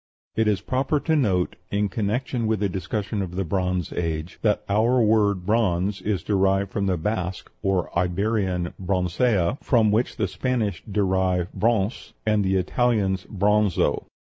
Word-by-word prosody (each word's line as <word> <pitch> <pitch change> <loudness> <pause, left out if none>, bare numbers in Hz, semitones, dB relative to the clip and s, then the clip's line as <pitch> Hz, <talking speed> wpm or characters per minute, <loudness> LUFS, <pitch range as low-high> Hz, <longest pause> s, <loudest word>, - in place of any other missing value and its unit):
It 110 -1 +2
is 100 -3 +1
proper 135 +6 0
to 160 - +1
note, 95 - +1
in 105 0 +1
connection 115 +4 -1
with 110 -2 0
a - - +3
discussion 100 +3 -3
of 90 -2 -5
the 95 - 0
Bronze 90 0 -1
Age, 80 0 -3
that 105 -2 +1
our 115 +5 +3
word 105 -5 +2
bronze 100 -2 +1
is 100 -1 -1
derived 95 -1 +1
from 100 -1 -1
the 95 -2 +1
Basque, 95 +1 -3
or 95 -3 -1
Iberian 90 0 0
broncea, 90 - +1
from 115 -5 +3
which 115 +4 +1
the 105 - 0
Spanish 115 0 -2
derive 95 -3 +1
bronce, 110 -1 0
and 105 -1 +2
the 95 0 +1
Italians 95 -1 +1
bronzo. 105 -1 +1
100 Hz, 150 wpm, -24 LUFS, 90-110 Hz, -, a